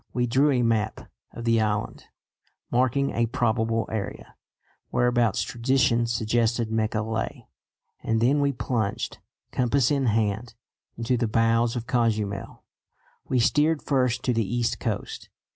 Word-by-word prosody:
We 125 0 +1
drew 135 +5 +3
a 125 -3 +2
map 110 -2 -1 0.2
of 115 - -8
the 115 -1 +3
island, 105 -1 -2 0.7
marking 130 +3 +2
a 115 0 +1
"probable 115 -2 0
area" 110 -3 -5 0.6
whereabouts 120 -4 +2
tradition 120 -2 +1
suggested 115 0 0
Mecca 110 -1 0
lay, 110 0 -4 0.5
and 115 0 0
then 130 +6 +3
we 140 0 +2
plunged, 110 -4 -2 0.3
compass 125 +1 +2
in 140 -3 +1
hand, 110 +1 0 0.4
into 120 +2 0
the 120 -1 0
bowels 115 +2 +2
of 120 -1 -3
Cozumel. 110 -5 -1 0.6
We 130 - +1
steered 150 +6 +2
first 125 -2 +1
to 125 - +1
the 115 -1 +1
east 120 -2 0
coast. - - -4
115 Hz, 135 wpm, -25 LUFS, 110-125 Hz, 0.7 s, drew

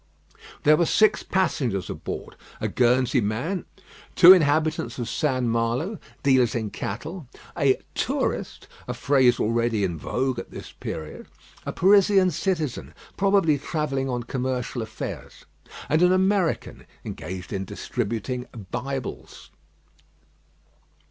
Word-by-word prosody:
There 150 +1 +6
were 170 - +2
six 215 0 +4
passengers 130 - -1
aboard; - - -6 0.2
a - - -1
Guernsey 125 +1 +2
man, 125 - -2 0.5
two 180 +1 +10
inhabitants 155 -2 +1
of 120 -3 -3
St. 130 -4 0
Malo, 120 - -1 0.2
dealers 130 -3 +3
in 110 -3 -2
cattle: 155 - -6 0.3
a 140 -5 +3 0.2
"tourist," - - -2 0.2
a 125 - -3
phrase 130 -1 +3
already 115 -1 +1
in 85 -4 -2
vogue 130 - -1
at - - -8
this - - -9
period 80 -1 -7 0.4
a - - -1
Parisian 195 0 +4
citizen, 160 -5 -2 0.2
probably 195 -7 +3
travelling 140 -3 -2
on 120 -1 -2
commercial 125 0 -3
affairs, 110 - -7 0.4
and 155 +2 +2
an 180 0 +5
American, 190 -1 0 0.2
engaged 90 +5 -6
in 95 -1 -2
distributing 115 +4 -4 0.2
Bibles. 135 0 -5
130 Hz, 115 wpm, -24 LUFS, 115-165 Hz, 0.5 s, two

